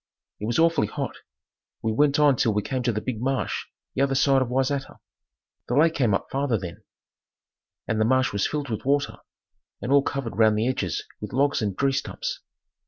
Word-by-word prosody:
It 105 - -3
was 120 - 0
awfully 165 -9 +3
hot. - - -4 0.7
We 110 - +1
went 140 +5 +3
on 145 -2 +5
till 115 - +2
we 105 - +1
came 130 -1 -2
to 120 -1 +1
the 110 -1 -3
big 115 -2 -4
marsh 135 +1 -1 0.3
the - - -1
other 135 -1 +2
side 135 0 +4
of 130 - 0
Wayzata. 135 +2 -1 0.7
The 125 - -1
lake 160 +3 +5
came 120 -10 +2
up - - -3
farther 135 -4 +1
then, 90 +2 -7 1.1
and 110 0 0
the - - +4
marsh 130 0 +2
was 100 - +1
filled 145 -3 -3
with 110 - -3
water, 140 +1 +1 0.6
and 125 - -4
all 140 0 +6
covered 135 -5 -4
round 110 -1 +5
the 110 +3 +1
edges 100 -9 -1 0.2
with - - -7
logs 140 +1 +2
and 100 -3 -2
tree 140 -1 +2
stumps. 135 0 -3
130 Hz, 200 wpm, -25 LUFS, 110-140 Hz, 1.1 s, all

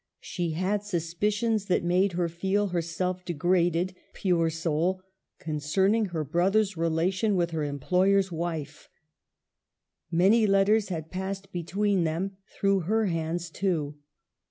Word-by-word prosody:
She 175 -3 -3
had 190 +5 0
suspicions 205 +4 -1
that 185 - +1
made 180 +2 +2
her 175 0 0
feel 190 +4 0
herself 180 +1 -2
degraded, 175 +1 +1 0.2
pure 175 -4 +1
soul, 165 +3 -1 0.3
concerning 190 +8 +1
her 170 -5 -3
brother's 190 +7 +1
relation 175 +6 +1
with 170 -2 +1
her 160 -2 -2
employer's 185 +7 +2
wife. 165 -3 -5 1.2
Many 195 +7 +4
letters 200 +1 +3
had 160 -3 -5
passed 190 +1 -5
between 190 +2 0
them, 180 +5 -2
through 195 -1 +1
her 215 +6 +1
hands 165 -1 -2
too. 155 -7 -2
180 Hz, 120 wpm, -27 LUFS, 165-195 Hz, 1.2 s, Many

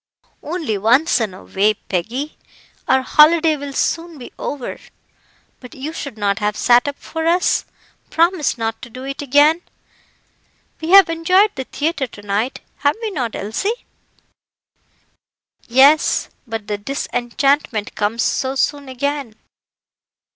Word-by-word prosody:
"Only 305 - -3
once 245 +6 +3
in 205 -5 -2
a - - -13
way, 210 +2 +1
Peggy; 235 - -4 0.5
our 265 0 +3
holiday 315 +3 +5
will 285 -1 -6
soon 330 +3 -2
be 250 - -11
over. 280 -4 -5 0.8
But 250 +4 -12
you 290 +4 -6
should 280 -7 -7
not 200 0 0
have 210 0 -1
sat 245 +2 +4
up 285 - -3
for 320 0 -4
us 350 +2 +2 0.4
promise 335 -4 +1
not 225 -1 -3
to 250 - -9
do 255 +3 -9
it 275 +1 -5
again. 290 +4 +4 1.2
We 320 - -4
have 390 +1 +8
enjoyed 365 +5 +3
the 265 -1 -5
theatre 295 -1 -2
to 215 - -13
night, 205 +5 -2 0.2
have 285 0 +1
we 450 -2 -3
not, 250 - -3
Elsie?" 395 - -3 1.8
"Yes, 275 +5 +4 0.2
but 225 -2 -5
the 205 0 -3
disenchantment 245 -1 -1
comes 225 +3 -1
so 265 0 -1
soon 285 0 -1
again." 275 -2 -3
275 Hz, 135 wpm, -19 LUFS, 225-315 Hz, 1.8 s, have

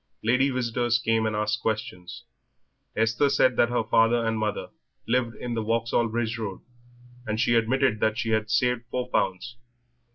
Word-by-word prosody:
Lady 125 +5 +3
visitors 120 -2 0
came 115 -2 +1
and 110 - -2
asked 105 +3 -1
questions. 90 -5 -4 0.7
Esther 115 +5 +2
said 130 -2 +3
that 120 - +3
her 120 -1 0
father 115 +1 +3
and 115 -1 -1
mother 110 -1 -2 0.4
lived 115 -1 0
in 120 -1 -5
the 115 - -1
Vauxhall 115 +1 0
Bridge 115 0 -2
Road, 100 -4 -5 0.7
and 110 0 -2
she 120 - +2
admitted 120 0 +2
that 110 0 +1
she 115 -1 -2
had 110 0 0
saved 125 +1 +1
four 125 0 -3
pounds. 95 +6 -1
115 Hz, 165 wpm, -26 LUFS, 110-120 Hz, 0.7 s, Lady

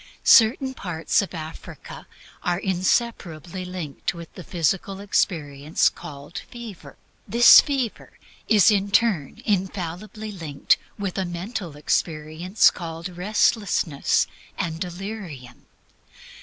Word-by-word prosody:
Certain 260 +4 +5
parts 170 - 0
of 195 -2 -6
Africa 160 0 -9 0.3
are 175 -1 0
inseparably 185 -2 -1
linked 180 -4 -4
with 170 -1 -10
the 180 - -9
physical 190 +4 -1
experience 155 -7 +1
called 150 -2 -9
fever; 210 -12 -10 0.3
this 235 +3 +9
fever 265 -6 -3 0.3
is 215 -1 +6
in 200 -1 +1
turn 200 - +1
infallibly 195 +2 -3
linked 160 -7 0 0.2
with 195 -2 -3
a - - +1
mental 175 -2 -5
experience 155 +5 +1
called 165 0 -6
restlessness 180 -4 +1 0.3
and 165 -4 -3
delirium. 175 - -7
180 Hz, 100 wpm, -24 LUFS, 160-205 Hz, 0.3 s, this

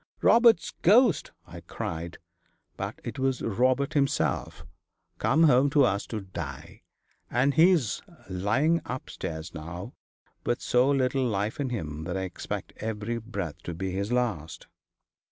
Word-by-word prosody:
"Robert's 230 -8 +5
ghost!" 215 - +4
I - - -10
cried; 85 +1 -5 0.6
but - - -5
it - - -6
was 130 -1 0
Robert 130 +6 +1
himself, 140 -3 0 0.5
come 155 +5 +3
home 140 -2 +5
to 145 0 +4
us 100 -5 +1
to 110 -2 -4
die. 95 -1 -8 0.5
And 130 +4 +2
he's 160 - +4 0.3
lying 110 - +1
upstairs 85 -9 -6
now, 85 +2 -7 0.5
with 120 - 0
so 125 +2 +3
little 135 -1 +2
life 105 +4 -2
in 140 -2 -1
him 80 -9 -4
that 90 +2 -3
I - - -2
expect 90 -2 -5
every 110 +1 -3
breath 100 -9 -5
to 85 - -6
be 95 +2 -3
his 100 +4 -2
last.' 115 -11 -1
120 Hz, 135 wpm, -27 LUFS, 95-140 Hz, 0.6 s, Robert's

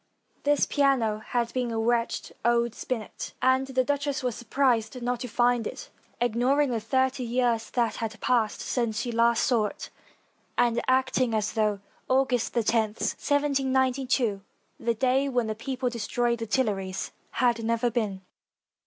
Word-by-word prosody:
This 290 0 +3
piano 260 -7 +2
had 235 +1 -2
been 250 -2 -1
a 225 - -3
wretched 230 +1 0
old 235 -1 +2
spinet, 235 -3 -5
and 260 +1 +3
the 260 -1 +1
duchess 285 +1 -1
was 250 -2 0
surprised 240 -1 0
not 245 0 -2
to 250 - -4
find 240 0 +2
it, - - -8 0.3
ignoring 250 +4 +2
the 230 - 0
thirty 260 +4 0
years 240 -1 0
that 235 -3 0
had 220 -1 -4
passed 230 -4 +1
since 230 -3 -1
she 240 - -2
last 235 0 +3
saw 230 -4 +2
it, - - -9 0.7
and 235 -1 +2
acting 255 -2 +2
as 215 -1 -1
though 210 -2 0 0.3
August 260 -3 +1
lo, 235 - +3
1792, 260 +1 +1 0.4
the 235 0 0
day 265 +4 +2
when 245 -3 +1
the 220 - -2
people 255 +3 -3
de 240 -1 -3
stroyed 235 +2 0
the 225 - -4
Tuileries, 200 -6 -1 0.2
had 235 -2 +1
never 230 +1 +1
been. 210 -5 -2
240 Hz, 155 wpm, -27 LUFS, 225-260 Hz, 0.7 s, This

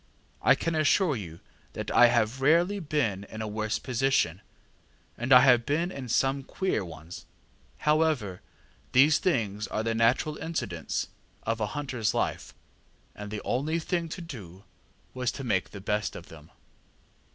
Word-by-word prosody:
I - - +5
can 165 - -2
assure 155 +1 +3
you 85 -7 -8 0.3
that - - -5
I 120 - +7
have 120 +2 +1
rarely 170 +8 +3
been 140 - -1
in 110 - -9
a - - -4
worse 110 +1 -2
position, 125 - 0 0.7
and 120 +3 -4
I 125 -1 +10
have 125 -3 +5
been 165 +7 0
in 130 -6 -7
some 135 +3 +1
queer 185 - -2
ones. 85 0 -10 0.5
However, 150 - +1 0.5
these 145 +4 +6
things 105 - 0
are 110 - -2
the 115 0 0
natural 120 +7 +2
incidents 125 - -3 0.3
of 115 0 -2
a 105 - +1
hunterŌĆÖs 125 -3 -2
life, - - -2 0.6
and 105 0 -8
the 105 0 -5
only 150 +6 0
thing 170 0 -2
to 175 - -6
do 100 - -10 0.5
was 125 -2 -1
to 135 - -6
make 100 -7 0
the 100 - -9
best 105 +2 -2
of 85 - -10
them. 80 -1 -13
125 Hz, 155 wpm, -28 LUFS, 105-150 Hz, 0.7 s, I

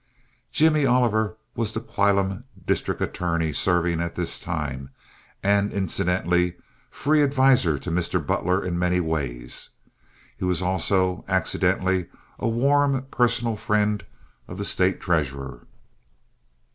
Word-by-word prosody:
Jimmy 155 -1 +3
Oliver 110 -4 +2 0.2
was 115 -2 -2
the 110 - -2
whilom 100 -1 0 0.2
district - - -1
attorney 85 -3 -1
serving 85 0 +1
at 85 0 -4
this 85 -2 -2
time, 75 -6 -4 0.5
and 100 +1 +2
incidentally 90 -2 0 0.3
free 150 +2 +2
adviser 130 - +4
to 85 - -5
Mr. 90 +1 0
Butler 90 +6 0
in 85 -1 -2
many 90 0 +2
ways. 70 -8 -3 0.7
He - - -8
was 90 -2 +1
also, 95 0 +1
accidentally, 95 -1 +1 0.3
a - - -1
warm 135 +3 +2
personal 120 -2 +1
friend 105 0 0 0.4
of 90 - -8
the 100 - -3
State 95 -1 +1
treasurer. 70 -7 -2
95 Hz, 120 wpm, -24 LUFS, 85-110 Hz, 0.7 s, adviser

